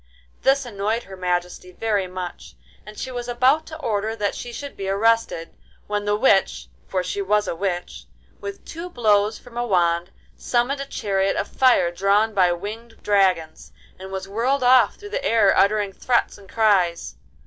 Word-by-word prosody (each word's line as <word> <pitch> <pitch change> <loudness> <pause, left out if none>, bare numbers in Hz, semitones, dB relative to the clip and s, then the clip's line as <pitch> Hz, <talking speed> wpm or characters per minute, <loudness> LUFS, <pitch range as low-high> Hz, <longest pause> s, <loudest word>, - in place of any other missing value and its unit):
This 270 0 +2
annoyed 220 +1 -2
Her 190 - -11
Majesty 180 0 -3
very 205 -1 -1
much, 180 -1 -7 0.3
and 210 0 -11
she 260 - -5
was 245 -1 -5
about 255 +6 +2
to 315 - -8
order 220 -6 -2
that 205 -2 -1
she 240 - -7
should 285 +4 -7
be 195 -1 -4
arrested, 210 -4 +1 0.3
when 205 0 -2
the 205 0 +1
witch—for 195 -4 0
she 190 +3 -3
was 205 +1 +1
a - - -2
witch—with 195 - -6
two 335 +2 -7
blows 215 -6 +2
from 245 -1 -14
a 240 - 0
wand 175 -3 +1 0.3
summoned 255 +3 0
a 275 - -5
chariot 195 -5 -1
of - - -2
fire 250 -9 +3
drawn 200 +5 +2
by 185 -3 +3
winged 220 +6 -7
dragons, 185 -6 +1 0.3
and 190 +1 -9
was 190 0 -5
whirled 250 +7 0
off 250 0 +5
through 410 - -11
the - - -3
air 225 - +4
uttering 205 0 +2
threats 240 +4 0
and 195 -2 -17
cries. 185 - +1
205 Hz, 170 wpm, -22 LUFS, 190-240 Hz, 0.3 s, off